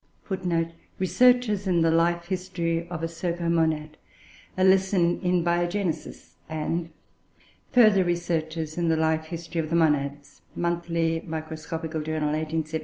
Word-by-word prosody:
[Footnote 175 -4 -1
5: 165 - -21 0.2
"Researches 215 0 +3
in 175 -2 +3
the 165 - +3
Life 170 +1 +2
history 170 -2 -2
of 170 -2 -5
a - - +2
Cercomonad: 165 -2 -1 0.6
a 185 - +2
Lesson 190 -2 +3
in 180 -2 +1
Biogenesis"; 175 +1 -2
and 165 +2 -2 0.8
"Further 215 -6 +6
Researches 165 -2 -2
in 170 - +1
the 160 -1 +2
Life 160 0 +1
history 165 0 -4
of 155 - -5
the 165 - 0
Monads," 145 -3 0
Monthly 170 -1 0
Microscopical 160 0 -5
Journal, 155 -1 -1
1873. 155 +1 -2
165 Hz, 130 wpm, -26 LUFS, 160-175 Hz, 0.8 s, Further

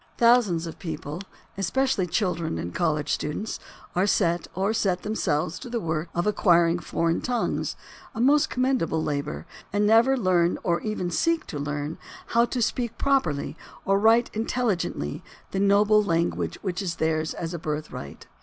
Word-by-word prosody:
Thousands 230 -8 +4
of 165 - -8
people, 160 -1 -5 0.4
especially 230 -1 +1
children 170 - -1
and 85 +2 -5
college 155 -4 0
youths, 150 +9 -3 0.4
are 185 +3 +2
set 175 -4 +1
or 195 +4 +1
set 185 -5 0
themselves 175 -6 -1
to 250 - -8
the 235 0 -1
work 165 -3 -2
of 175 - 0
acquiring 175 -4 +3
foreign 165 +1 0
tongues, 245 -2 -1 0.4
a - - -4
most 290 +5 +4
commendable 250 -12 0
labor, 140 - -3 0.3
and 205 +1 +2
never 230 +5 +5
learn 180 -5 +2
or 170 -1 +1
even 215 -5 -2
seek 330 - +1
to 145 - -6
learn 145 +2 -3 0.3
how 235 0 +4
to 240 0 -1
speak 235 0 -2
properly 265 - 0 0.3
or 195 0 +3
write 225 +3 +4
intelligently 215 - -1 0.3
the 195 - -1
noble 205 +2 +5
lan 170 -4 +1
guage - - -3
which 185 -1 -2
is 175 -4 -2
theirs 160 0 0
as 165 0 -4
a 170 - -4
birthright. 150 - -5
180 Hz, 160 wpm, -25 LUFS, 160-225 Hz, 0.4 s, never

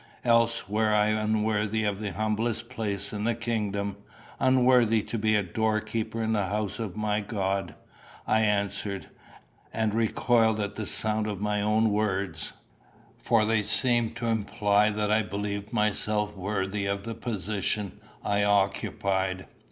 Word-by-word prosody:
"Else 115 -2 +3
were 110 +2 +1
I 105 0 +3
unworthy 110 0 0
of 100 -1 -1
the 100 -3 -3
humblest 110 +3 -1
place 100 -5 -2
in 105 0 -3
the 115 +1 +1
kingdom 105 -4 -2 0.4
unworthy 125 -4 +4
to - - -6
be 110 0 +2
a 105 - +2
doorkeeper 110 +3 -1
in 110 0 0
the 100 -3 +1
house 105 +2 -2
of 105 -5 -4
my 105 -1 0
God," 100 -2 -2 0.5
I 110 - +3
answered, 100 -2 -1 0.6
and 110 -2 0
recoiled 115 0 +2
from 100 -1 -2
the 105 -1 -4
sound 110 0 +1
of 105 -3 -3
my 105 0 0
own 110 +1 +2
words; 100 -2 -1 0.7
for 115 -2 +3
they 110 0 +2
seemed 120 +1 +1
to 120 0 -4
imply 105 -2 +2
that 105 0 -1
I 110 +1 +4
believed 100 +1 -4
myself 105 0 0
worthy 100 +1 -2
of 100 0 -2
the 115 - -4
position 105 -3 -2 0.3
I 100 0 +2
occupied. 95 -1 0
105 Hz, 145 wpm, -27 LUFS, 100-110 Hz, 0.7 s, unworthy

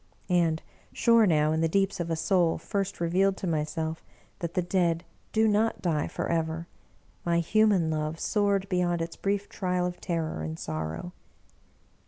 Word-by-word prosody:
And, 165 -3 +2 0.3
sure 230 -2 +4
now, 155 -3 +3
in 160 0 +1
the 165 - +3
deeps 195 +2 +1
of 170 -1 -2
a 165 - +1
soul 170 0 +2
first 200 -2 -3
re 170 - 0
vealed 190 +3 +3
to 190 - -6
myself, 160 0 -2 0.4
that 170 -1 -4
the 180 - +2
Dead 175 -2 +1 0.3
do 220 0 +3
not 215 +2 +2
die 160 -4 0
forever, 165 0 -2 0.6
my 170 -1 +1
human 190 -1 +3
love 155 +1 -2
soared 200 -2 +1
beyond 175 -2 +1
its 165 0 -6
brief 200 0 -1
trial 180 -2 -1
of 180 0 -4
terror 165 - -2
and 80 0 -4
sor 80 -1 -3
row. 85 +2 -6
170 Hz, 170 wpm, -28 LUFS, 160-195 Hz, 0.6 s, sure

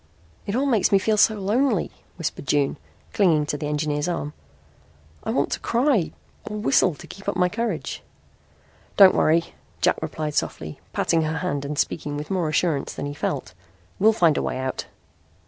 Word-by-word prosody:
"It 200 - -1
all 265 +3 +1
makes 235 -8 +2
me 200 - +6
feel 215 +3 +1
so 215 +1 +4
lonely," 215 +2 +1 0.3
whispered 165 -4 -4
June, 145 +1 +1 0.4
clinging 165 -7 +3
to 145 - -2
the 145 0 -4
engineer's 150 0 -1
arm. 150 -4 -3 0.9
"I - - -4
want - - +1
to - - -1
cry 235 - +1 0.4
or 210 - -4
whistle 180 -2 +3
to - - -12
keep 195 +1 -6
up 200 - -2
my 180 0 +3
courage." 230 +5 -3 1.0
"Don't 195 -2 +9
worry," 165 +2 +2 0.3
Jack - - +3
replied 155 -1 -3
softly, 75 - -3
patting 165 - +1
her 155 0 -1
hand 145 -6 -2
and 145 +1 -4
speaking 145 -1 -1
with 150 +5 -6
more 180 -5 0
assurance 155 -2 0
than - - -4
he 145 - -4
felt. 130 -10 -3 0.5
"We'll 215 +3 +6
find 170 -9 +3
a - - +1
way - - -2
out." 130 0 -3
165 Hz, 180 wpm, -24 LUFS, 145-200 Hz, 1.0 s, Don't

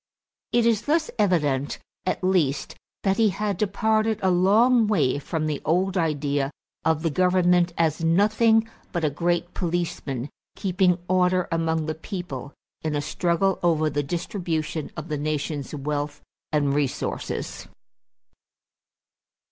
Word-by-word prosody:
It 235 0 +3
is 230 -2 +3
thus 320 +1 +1
evident 150 -9 +1 0.3
at 185 - -1
least 155 -8 +1 0.3
that 195 0 +2
he 225 -2 +4
had 205 +1 -1
departed 215 +2 +1
a 190 - +4
long 220 +6 +4
way 145 -10 +2
from 155 +2 -3
the 150 -2 -2
old 185 +5 +1
idea 145 -5 0 0.3
of 160 0 +1
the 165 - +1
government 180 0 +3
as 165 -1 +1
nothing 220 +6 +4 0.2
but 170 -3 -1
a 150 - +1
great 175 +3 -1
policeman 165 -7 -2 0.2
keeping 185 -2 +2
order 180 0 +2
among 165 -1 0
the 155 - -2
people 160 - -6 0.3
in 155 -1 -2
a - - +1
struggle 175 +5 0
over 155 -3 +2
the 145 +1 0
distribution 165 -1 -3
of 155 +1 -5
the 150 -3 -3
nation's 150 -1 -3
wealth 145 0 -3 0.3
and 145 -2 +2
resources. 140 -2 -3
170 Hz, 130 wpm, -25 LUFS, 150-190 Hz, 0.3 s, he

